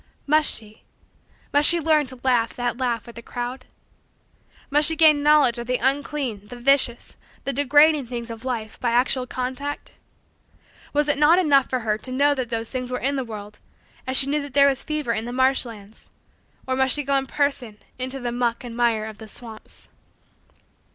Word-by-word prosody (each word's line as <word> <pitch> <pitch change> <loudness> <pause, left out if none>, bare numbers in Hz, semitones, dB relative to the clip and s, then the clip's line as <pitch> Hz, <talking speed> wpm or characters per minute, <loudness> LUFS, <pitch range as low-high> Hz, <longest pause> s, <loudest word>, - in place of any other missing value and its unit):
Must 305 +1 +3
she 215 -1 -4 0.7
must 290 +1 +6
she 345 - +3
learn 310 -2 +2
to 260 -1 -12
laugh 240 -3 +1
that 245 0 -3
laugh 240 -3 -1
with 235 - -12
the - - -7
crowd? 245 +2 -6 1.1
Must 295 +1 +4
she 320 - +3
gain 310 -2 +5
knowledge 290 -5 +4
of 235 - -6
the 250 0 +1
unclean, 265 -5 -1
the 245 - -9
vicious, 245 -1 +1 0.3
the 275 - -2
degrading 290 +1 +4
things 235 -1 -6
of 225 +1 -9
life 230 -4 -5
by 240 -2 -1
actual 250 +1 +1
contact? 260 +4 -5 1.0
Was 295 0 +1
it 290 -1 +1
not 305 +4 +5
enough 285 -7 +3
for 255 -1 -1
her 215 -1 -1
to 255 - -7
know 285 +3 +3
that 255 -4 -4
those 230 -1 -4
things 255 -1 -4
were 250 - -2
in 275 +3 -1
the 265 - -2
world 210 -3 -9 0.5
as 260 0 +2
she 270 - +6
knew 295 +2 0
that 285 -2 -9
there 280 0 +7
was 270 -1 0
fever 300 -6 -2
in 220 0 -3
the 240 - -5
marsh 260 +1 +2
lands; 215 -2 -13 0.6
or 260 - -1
must 265 0 +2
she 295 - -2
go 280 0 0
in 270 -1 0
person 275 -7 -1 0.2
into 260 +2 -3
the 245 -1 -3
muck 240 -1 -1
and 235 -2 -8
mire 230 -3 +1
of 220 -1 -9
the 220 - -10
swamps? 220 0 -9
255 Hz, 200 wpm, -23 LUFS, 235-285 Hz, 1.1 s, there